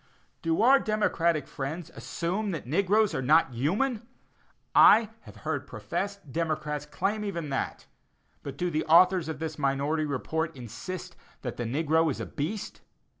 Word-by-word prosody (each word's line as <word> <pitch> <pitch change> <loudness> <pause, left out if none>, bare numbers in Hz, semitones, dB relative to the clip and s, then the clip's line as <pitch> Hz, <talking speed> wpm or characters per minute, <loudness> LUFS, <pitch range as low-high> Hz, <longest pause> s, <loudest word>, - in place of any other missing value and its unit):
Do 165 +4 +1
our 270 +3 +7
democratic 175 - +1
friends 150 +5 -5
assume 170 - -3
that 165 - -4
the 125 - -10
negroes 200 +3 +3
are 130 - -1
not 150 0 +4
human? 210 - 0 0.7
I 220 0 +7
have - - -12
heard - - -2
professed 200 -7 -5
democrats 150 -2 -2
claim 210 +7 -1
even 170 -7 -4
that; 135 - -3 0.6
but 140 -1 -7
do 175 +2 -1
the 155 0 0
authors 175 +1 +5
of 160 - -4
this 155 0 -5
minority 145 +3 0
report 160 +3 -2
insist 135 - -7 0.3
that - - -4
the 120 - -3
negro 160 +6 +2
is 135 - -3
a - - -3
beast? 190 +9 -5
160 Hz, 155 wpm, -28 LUFS, 145-195 Hz, 0.7 s, our